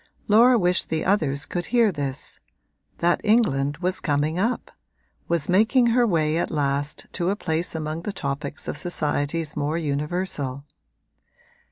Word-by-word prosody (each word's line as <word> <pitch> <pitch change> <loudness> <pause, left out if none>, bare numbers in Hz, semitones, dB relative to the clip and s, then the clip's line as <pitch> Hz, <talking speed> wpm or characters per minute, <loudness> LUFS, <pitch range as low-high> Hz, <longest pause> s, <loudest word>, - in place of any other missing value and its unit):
Laura 235 +4 +6
wished 180 -3 +2
the 160 -1 -1
others 155 -7 +1
could 175 -1 -4
hear 235 -3 +3
this 140 -4 -5 0.6
that 175 0 +1
England 145 - +2
was 185 +1 0
coming 150 +3 0
up, 230 +6 -1 0.6
was 170 -3 -1
making 220 +7 +4
her 240 -1 +4
way 160 -4 +1
at 170 - -1
last 145 -1 -2
to 175 0 -1
a 200 - +1
place 165 -3 -2
among 155 +1 -3
the 205 - -4
topics 140 -4 -4
of - - -3
societies 150 -1 -1
more 150 +2 -1
universal. 145 -2 -2
165 Hz, 145 wpm, -24 LUFS, 145-185 Hz, 0.6 s, Laura